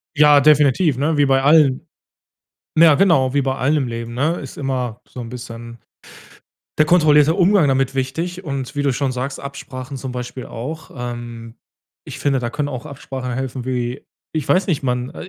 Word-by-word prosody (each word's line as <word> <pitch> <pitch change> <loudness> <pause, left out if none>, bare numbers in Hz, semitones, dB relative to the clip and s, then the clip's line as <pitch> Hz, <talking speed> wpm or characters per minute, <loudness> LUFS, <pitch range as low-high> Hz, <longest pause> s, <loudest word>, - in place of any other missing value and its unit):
Ja, 150 -1 +6
definitiv, 150 0 +4
ne, 150 +2 0
wie 145 - +4
bei 135 -1 +3
allen. 150 +1 +4 0.9
Ja, 160 -2 +7
genau, 145 -9 +3
wie 140 - +3
bei 135 -1 -1
allem 145 +2 +1
im - - -3
Leben, 115 0 -5
ne, 155 +7 0
ist 135 - -9
immer 125 -4 -3
so 125 - -10
'n 115 - -7
bisschen 115 -1 -9 1.0
der 155 - +4
kontrollierte 155 -2 +5
Umgang 185 -4 +4
damit 135 0 +1
wichtig, 165 +8 -3
und 135 -5 -5
wie 145 - -1
du 140 - +2
schon 135 0 -1
sagst, 130 +2 -4
Absprachen 135 -1 -8
zum 130 -1 -6
Beispiel 125 +1 -6
auch. 155 +7 -7
Ähm, 120 -1 -7 0.5
ich - - -8
finde, 140 -2 +1
da 120 -2 -2
können 145 +4 -3
auch 130 +3 -6
Absprachen 135 -3 -6
helfen 130 -1 -4
wie 125 0 -3 0.3
ich 155 -3 -3
weiß 190 +2 +2
nicht, 150 -5 0
man 125 0 -1
äh, 185 - -9
135 Hz, 185 wpm, -20 LUFS, 125-150 Hz, 1.0 s, Ja